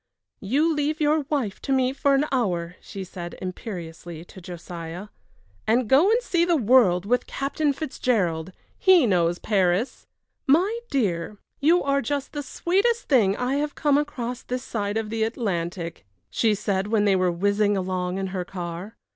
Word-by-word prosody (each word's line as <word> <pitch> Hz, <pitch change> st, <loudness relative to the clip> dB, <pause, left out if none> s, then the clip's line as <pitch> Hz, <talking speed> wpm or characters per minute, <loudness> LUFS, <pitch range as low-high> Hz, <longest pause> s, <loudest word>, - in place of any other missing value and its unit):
"You 290 Hz, +11 st, +1 dB
leave 300 Hz, +1 st, -1 dB
your 300 Hz, -1 st, +2 dB
wife 255 Hz, -10 st, -1 dB
to 275 Hz, -, -4 dB
me 260 Hz, -1 st, +2 dB
for 280 Hz, 0 st, +2 dB
an 275 Hz, +2 st, +2 dB
hour," 180 Hz, -9 st, -1 dB
she 195 Hz, -, -7 dB
said, 175 Hz, -1 st, -8 dB
imperiously, 175 Hz, -3 st, -7 dB
to 185 Hz, -, -13 dB
Josiah, 175 Hz, +2 st, -7 dB, 0.6 s
"and 230 Hz, +2 st, +2 dB
go 285 Hz, -, +5 dB
and 460 Hz, +2 st, +4 dB
see 345 Hz, -7 st, +1 dB
the 345 Hz, -1 st, +3 dB
world 220 Hz, -, +4 dB
with 245 Hz, +4 st, +1 dB
Captain 285 Hz, +2 st, -1 dB
Fitzgerald. 205 Hz, -, -1 dB, 0.3 s
He 370 Hz, -7 st, +6 dB
knows 175 Hz, -4 st, +2 dB
Paris." 195 Hz, +3 st, 0 dB, 0.4 s
"My 370 Hz, +11 st, +3 dB
dear, 205 Hz, -7 st, -1 dB, 0.2 s
you 335 Hz, +5 st, +4 dB
are 275 Hz, 0 st, +1 dB
just 280 Hz, +3 st, -3 dB
the 290 Hz, -, -3 dB
sweetest 395 Hz, -, 0 dB
thing 210 Hz, -8 st, +4 dB
I 250 Hz, +3 st, 0 dB
have 295 Hz, 0 st, -2 dB
come 290 Hz, -1 st, +3 dB
across 250 Hz, -4 st, -4 dB
this 250 Hz, +1 st, -4 dB
side 205 Hz, -3 st, -2 dB
of 220 Hz, -1 st, -3 dB
the 225 Hz, 0 st, -2 dB
Atlantic," 180 Hz, -7 st, -2 dB, 0.3 s
she 220 Hz, -2 st, +2 dB
said, 195 Hz, -1 st, -1 dB
when 210 Hz, -1 st, +2 dB
they 200 Hz, -2 st, +4 dB
were 185 Hz, -1 st, +2 dB
whizzing 205 Hz, +3 st, +1 dB
along 185 Hz, -1 st, -2 dB
in 195 Hz, -, -2 dB
her 185 Hz, -2 st, -2 dB
car. 175 Hz, +2 st, -6 dB
220 Hz, 165 wpm, -24 LUFS, 185-280 Hz, 0.6 s, He